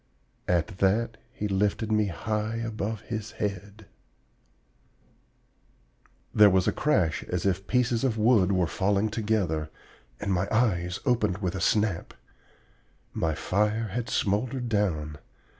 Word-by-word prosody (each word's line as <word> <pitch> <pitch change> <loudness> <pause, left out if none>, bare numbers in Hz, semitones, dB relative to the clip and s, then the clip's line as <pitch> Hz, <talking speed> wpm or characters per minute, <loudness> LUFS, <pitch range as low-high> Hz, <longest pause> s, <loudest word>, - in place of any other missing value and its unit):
At 90 +3 0
that 110 +4 +1
he 105 - -3
lifted 105 +2 0
me 105 -1 +2
high 105 +4 -2
above 110 -2 -3
his 110 -3 -5
head 105 +1 -5 1.4
" - - -38
There 105 -1 +7
was 95 -1 +2
a - - +4
crash 90 - +1
as 90 0 -3
if 95 0 0
pieces 125 -2 +1
of 120 -4 +1
wood 110 -4 +4
were 90 -2 +2
falling 100 +4 +1
together 105 -8 -1 0.5
and 100 -2 -1
my 90 +2 0
eyes 90 -6 +1
opened 110 -8 +1
with 95 -3 -2
a 95 - -4
snap. 105 -5 0 1.0
My 80 -2 0
fire 105 +6 0
had 115 +4 -3
smoldered 120 +5 0
down. 80 -9 -1
105 Hz, 130 wpm, -27 LUFS, 90-110 Hz, 1.4 s, There